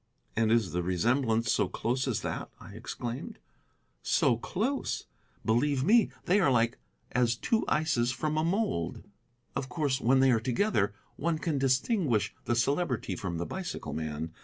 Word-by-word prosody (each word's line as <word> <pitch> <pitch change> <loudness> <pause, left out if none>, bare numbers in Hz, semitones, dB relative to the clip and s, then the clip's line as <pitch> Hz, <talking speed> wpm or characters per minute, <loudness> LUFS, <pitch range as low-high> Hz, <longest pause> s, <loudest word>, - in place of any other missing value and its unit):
"And 110 -1 +2
is 115 -5 +2
the 90 - -1
resemblance 115 +5 +1
so - - +2
close 130 +3 -1
as 120 -5 0
that?" - - -4
I - - -11
exclaimed. 120 +1 -6 0.6
"So 120 - +3
close! 225 - -2 0.4
Believe 130 +4 +2
me, 220 - +5 0.2
they 190 +4 +4
are 185 - +4
as - - +3
like 115 0 +2 0.3
as 120 -1 +2
two 220 - 0
ices 150 -7 +1
from 150 +5 -1
a 155 - +1
mould. 170 - -1 0.5
Of 130 - -3
course, 135 -1 0
when 130 +3 +4
they 135 0 +5
are 115 - +3
together 120 - +1 0.2
one 165 +1 0
can 155 -3 -1
distinguish 135 - +1
the 120 - +1
Celebrity 130 - 0
from 85 -2 -4
the 85 - -2
bicycle 180 - -5
man. 80 +1 -4
125 Hz, 160 wpm, -30 LUFS, 115-155 Hz, 0.6 s, me